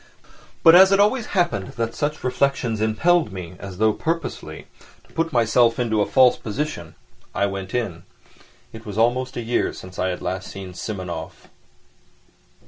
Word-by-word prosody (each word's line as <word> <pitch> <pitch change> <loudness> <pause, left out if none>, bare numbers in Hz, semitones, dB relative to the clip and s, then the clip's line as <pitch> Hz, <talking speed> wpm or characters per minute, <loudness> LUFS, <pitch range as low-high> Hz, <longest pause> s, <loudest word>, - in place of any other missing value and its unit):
But 165 - +9
as 190 +2 +8
it 195 - +4
always 215 +3 +2
happened 110 - 0
that 115 0 -3
such 150 +1 -3
reflections 125 -3 0
impelled 110 - +2
me, 90 -3 -7
as 95 -2 -8
though 110 +1 +3
purposely, 165 +3 -4 0.4
to - - -24
put 165 0 -1
myself 115 -1 +3
into 110 -3 +1
a 100 - +1
false 130 -1 +5
position, 110 - -5 0.4
I 100 - +2
went 95 0 -5
in. 100 -9 -2 0.7
It 110 0 -10
was 105 -3 -7
almost 125 +3 +1
a - - -2
year 120 +1 0
since 90 0 -11
I 95 - +1
had 90 -1 -4
last 95 +1 -4
seen 95 -2 -8
Simonov. 90 -5 -6
115 Hz, 160 wpm, -22 LUFS, 95-140 Hz, 0.7 s, But